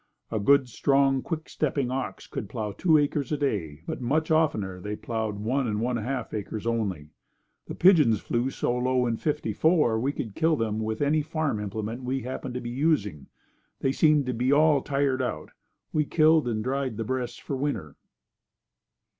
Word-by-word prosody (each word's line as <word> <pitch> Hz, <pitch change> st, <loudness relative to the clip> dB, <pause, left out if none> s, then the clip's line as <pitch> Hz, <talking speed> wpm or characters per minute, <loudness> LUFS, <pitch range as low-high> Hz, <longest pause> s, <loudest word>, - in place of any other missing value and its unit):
A 110 Hz, -, 0 dB
good 140 Hz, +5 st, +4 dB
strong, 135 Hz, +2 st, +2 dB
quick 160 Hz, +1 st, -4 dB
stepping 140 Hz, -4 st, -1 dB
ox 130 Hz, 0 st, -4 dB
could 100 Hz, -, -6 dB
plow 110 Hz, -2 st, -3 dB
two 160 Hz, -, +3 dB
acres 145 Hz, -2 st, 0 dB
a 150 Hz, -, +1 dB
day 85 Hz, -, -2 dB
but -, -, -5 dB
much 155 Hz, +6 st, 0 dB
oftener 105 Hz, -, +1 dB
they 105 Hz, +2 st, -4 dB
plowed 110 Hz, -2 st, -3 dB
one 125 Hz, +5 st, 0 dB
and 105 Hz, -1 st, -1 dB
one 120 Hz, +2 st, 0 dB
half 125 Hz, +4 st, -4 dB
acres 105 Hz, +1 st, -4 dB
only. 100 Hz, -10 st, -2 dB, 0.6 s
The -, -, -6 dB
pigeons 150 Hz, -, +5 dB
flew 120 Hz, +5 st, -1 dB
so 120 Hz, -, -1 dB
low 125 Hz, 0 st, +1 dB
in 115 Hz, -2 st, 0 dB
'54 150 Hz, -1 st, +1 dB
that 110 Hz, -, +1 dB
we 135 Hz, +5 st, 0 dB
could 110 Hz, -7 st, -5 dB
kill 160 Hz, +4 st, +2 dB
them 110 Hz, -4 st, -1 dB
with 110 Hz, +3 st, -2 dB
any 150 Hz, +2 st, +2 dB
farm 155 Hz, -6 st, -2 dB
implement 110 Hz, +4 st, -4 dB
we 130 Hz, +1 st, -2 dB
happened 130 Hz, 0 st, -5 dB
to 125 Hz, -, -3 dB
be 120 Hz, 0 st, -5 dB
using. 120 Hz, -, 0 dB, 0.5 s
They 135 Hz, -, +2 dB
seemed 150 Hz, 0 st, +3 dB
to 125 Hz, -, -1 dB
be 125 Hz, +3 st, 0 dB
all 150 Hz, -1 st, +5 dB
tired 140 Hz, -1 st, 0 dB
out. 75 Hz, -12 st, -4 dB, 0.4 s
We 150 Hz, -1 st, +2 dB
killed 155 Hz, -2 st, +4 dB
and 110 Hz, -2 st, -1 dB
dried 130 Hz, -2 st, -2 dB
the 115 Hz, -, -2 dB
breasts 120 Hz, +1 st, -3 dB
for 140 Hz, -, -5 dB
winter. 130 Hz, -, -3 dB
125 Hz, 185 wpm, -26 LUFS, 110-145 Hz, 0.6 s, pigeons